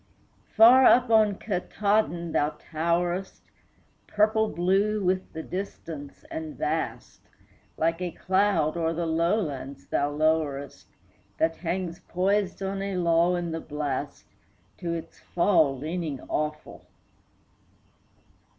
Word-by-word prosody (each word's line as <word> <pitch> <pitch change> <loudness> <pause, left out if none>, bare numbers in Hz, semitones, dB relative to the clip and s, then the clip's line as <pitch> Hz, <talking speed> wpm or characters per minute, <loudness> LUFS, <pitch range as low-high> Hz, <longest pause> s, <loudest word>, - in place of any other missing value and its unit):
Far 240 +4 +8
up 245 -2 +5
on 215 -2 +5
Katahdin 195 -3 -1
thou 150 0 0
towerest, 175 +4 -2 0.6
Purple 220 +1 +2
blue 195 +4 +1
with 185 +1 0
the 160 - -5
distance 165 -6 -7
and 160 -1 -6
vast; 160 +2 -4 0.5
Like 165 +2 0
a 180 - -1
cloud 185 -4 +1
o'er 165 -1 0
the 170 +1 -2
lowlands 160 -5 -1
thou 145 - 0
lowerest, 150 -2 -1 0.5
That 165 0 +1
hangs 175 0 -3
poised 195 +2 -1
on 195 0 -3
a 195 -1 -3
lull 170 0 +3
in 175 -1 -3
the 165 0 -4
blast, 145 -3 -4 0.5
To 170 - -3
its 165 - -8
fall 165 -6 +2
leaning 155 -1 -4
awful. 150 0 -4
170 Hz, 115 wpm, -26 LUFS, 155-195 Hz, 0.6 s, Far